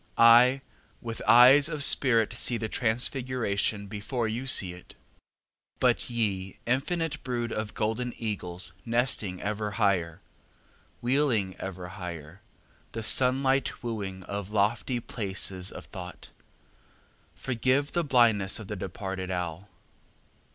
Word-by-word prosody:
I 120 Hz, +3 st, +6 dB, 0.4 s
with 115 Hz, -1 st, -6 dB
eyes 130 Hz, +5 st, +8 dB
of 150 Hz, -3 st, -2 dB
spirit 115 Hz, -6 st, +3 dB
see 120 Hz, +1 st, +3 dB
the 110 Hz, -1 st, -3 dB
Transfiguration 115 Hz, -3 st, -1 dB
Before 110 Hz, +4 st, -3 dB
you 120 Hz, +5 st, -4 dB
see 95 Hz, -8 st, +3 dB
it. 90 Hz, 0 st, -14 dB, 0.8 s
But -, -, +1 dB
ye 100 Hz, -5 st, -2 dB
infinite 150 Hz, +5 st, -1 dB
brood 120 Hz, -2 st, -3 dB
of 110 Hz, -1 st, -4 dB
golden 115 Hz, +3 st, -2 dB
eagles 90 Hz, -5 st, -4 dB
nesting 115 Hz, -6 st, 0 dB
ever 105 Hz, 0 st, -3 dB
higher, 90 Hz, -7 st, +1 dB, 0.8 s
Wheeling 120 Hz, -7 st, +1 dB
ever 90 Hz, -2 st, -6 dB
higher, 90 Hz, -2 st, -8 dB, 0.5 s
the 115 Hz, -, -4 dB
sun 130 Hz, +3 st, +3 dB
light 135 Hz, 0 st, 0 dB
wooing 100 Hz, -5 st, -5 dB
Of 100 Hz, +1 st, -5 dB
lofty 110 Hz, +4 st, 0 dB
places 95 Hz, -5 st, -2 dB
of -, -, -10 dB
Thought, 90 Hz, -2 st, -10 dB, 1.0 s
Forgive 130 Hz, +3 st, 0 dB
the 175 Hz, -, 0 dB
blindness 115 Hz, -8 st, +3 dB
of 110 Hz, -, -8 dB
the 105 Hz, -, -3 dB
departed 95 Hz, 0 st, -5 dB
owl. 90 Hz, +1 st, -4 dB
110 Hz, 120 wpm, -27 LUFS, 95-125 Hz, 1.0 s, eyes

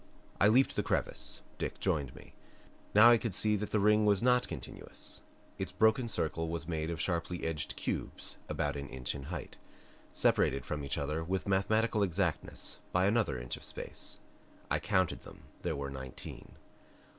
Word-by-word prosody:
I 100 Hz, -, +6 dB
leaped 125 Hz, +5 st, +4 dB
the -, -, +2 dB
crevice; -, -, -1 dB, 0.2 s
Dick -, -, -3 dB
joined 70 Hz, -4 st, 0 dB
me. -, -, -14 dB, 0.6 s
Now 115 Hz, +3 st, +10 dB
I 120 Hz, -, +6 dB
could 110 Hz, -6 st, -1 dB
see 105 Hz, +2 st, +3 dB
that 105 Hz, +1 st, -3 dB
the 105 Hz, -, +2 dB
ring 105 Hz, +1 st, +5 dB
was 105 Hz, 0 st, +3 dB
not 125 Hz, 0 st, +4 dB
continuous. -, -, -5 dB, 0.4 s
Its 95 Hz, -1 st, -2 dB
broken 110 Hz, +6 st, +3 dB
circle 80 Hz, -5 st, -1 dB
was 85 Hz, -1 st, -3 dB
made 80 Hz, -2 st, -2 dB
of 85 Hz, -, -3 dB
sharply 85 Hz, -1 st, -1 dB
edged 80 Hz, -1 st, -2 dB
cubes -, -, -4 dB
about 75 Hz, 0 st, -1 dB
an 70 Hz, 0 st, -5 dB
inch 65 Hz, -2 st, -2 dB
in 70 Hz, -2 st, -7 dB
height, 80 Hz, 0 st, -6 dB, 0.5 s
separated 70 Hz, -1 st, +2 dB
from 75 Hz, -1 st, -3 dB
each 70 Hz, -, -2 dB
other 75 Hz, +3 st, -1 dB
with 95 Hz, +4 st, -2 dB
mathematical 110 Hz, +3 st, +2 dB
exactness 90 Hz, -5 st, -1 dB
by 90 Hz, +1 st, +3 dB
another 100 Hz, -, +2 dB
inch -, -, -4 dB
of -, -, -14 dB
space. -, -, -5 dB, 0.5 s
I -, -, +3 dB
counted 95 Hz, -4 st, +1 dB
them -, -, -13 dB, 0.2 s
there -, -, -1 dB
were 70 Hz, -1 st, -4 dB
nineteen. 65 Hz, -1 st, -8 dB
90 Hz, 170 wpm, -33 LUFS, 75-105 Hz, 0.6 s, Now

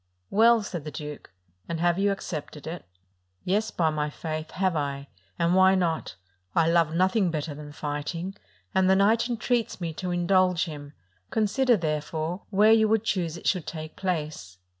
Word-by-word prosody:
"Well," 225 Hz, +2 st, +5 dB
said 175 Hz, -5 st, -5 dB
the 155 Hz, -, -5 dB
duke, 150 Hz, -1 st, -8 dB, 0.4 s
"and 165 Hz, -1 st, -2 dB
have 175 Hz, +1 st, +2 dB
you 200 Hz, 0 st, +3 dB
ac 195 Hz, -, -4 dB
cepted 150 Hz, -3 st, -6 dB
it?" 170 Hz, +2 st, -6 dB, 0.6 s
"Yes, 210 Hz, +4 st, +1 dB
by 160 Hz, -3 st, +1 dB
my 150 Hz, -1 st, -1 dB
faith, 155 Hz, +1 st, -5 dB
have 185 Hz, -2 st, 0 dB
I: 140 Hz, -2 st, -3 dB, 0.3 s
and 170 Hz, 0 st, +2 dB
why 190 Hz, +1 st, +6 dB
not? 170 Hz, -, -1 dB, 0.4 s
I 165 Hz, -1 st, +4 dB
love 165 Hz, -2 st, +3 dB
nothing 185 Hz, +2 st, +3 dB
better 155 Hz, -1 st, -3 dB
than 145 Hz, 0 st, -9 dB
fighting, 150 Hz, +5 st, -4 dB, 0.4 s
and 190 Hz, -1 st, +3 dB
the 190 Hz, -, +6 dB
knight 220 Hz, +5 st, +3 dB
entreats 235 Hz, -2 st, -1 dB
me 170 Hz, -3 st, -3 dB
to 180 Hz, +3 st, -4 dB
indulge 180 Hz, 0 st, +2 dB
him: 145 Hz, -3 st, -8 dB, 0.4 s
consider, 230 Hz, +3 st, +2 dB
therefore, 160 Hz, +2 st, -2 dB
where 210 Hz, +2 st, +5 dB
you 220 Hz, -1 st, +5 dB
would 220 Hz, 0 st, +2 dB
choose 175 Hz, -7 st, -1 dB
it -, -, -12 dB
should 180 Hz, -5 st, +1 dB
take 155 Hz, -1 st, -6 dB
place." 155 Hz, -, -3 dB
175 Hz, 175 wpm, -26 LUFS, 155-195 Hz, 0.6 s, why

